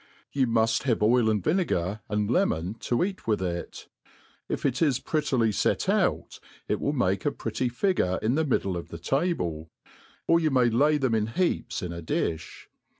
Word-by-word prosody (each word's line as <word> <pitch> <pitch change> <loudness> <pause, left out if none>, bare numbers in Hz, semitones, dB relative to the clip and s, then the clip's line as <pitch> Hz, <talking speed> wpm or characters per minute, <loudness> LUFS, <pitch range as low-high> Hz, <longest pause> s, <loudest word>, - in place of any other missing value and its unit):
You 135 -2 +1
muft 115 -1 +2
have 115 -5 +1
oil 115 +1 +4
and 105 -4 0
vinegar, 110 - 0
and 105 -1 0
lemon^i 110 - 0
to 120 +6 0
eat 190 - -4
with 110 -2 +2
it. 85 -2 -5 0.6
If - - -3
it 130 -2 0
is 145 -6 +3
prettily 130 -7 0
fet - - 0
out, - - 0 0.3
it - - -1
will - - +1
make - - 0
a - - +1
pretty 125 - -2
figure 120 - 0
in 110 +3 +2
the 160 +3 +2
middle 100 - 0
of 85 - -5
the 85 - -8
table, 85 - -1 0.6
or 165 - +4
you 160 -2 +1
may 125 -4 +3
lay 145 +6 +3
them 130 -5 0
in 110 -1 +1
heaps 175 +3 -1
inadiih. 85 -2 -3
115 Hz, 175 wpm, -27 LUFS, 95-145 Hz, 0.6 s, oil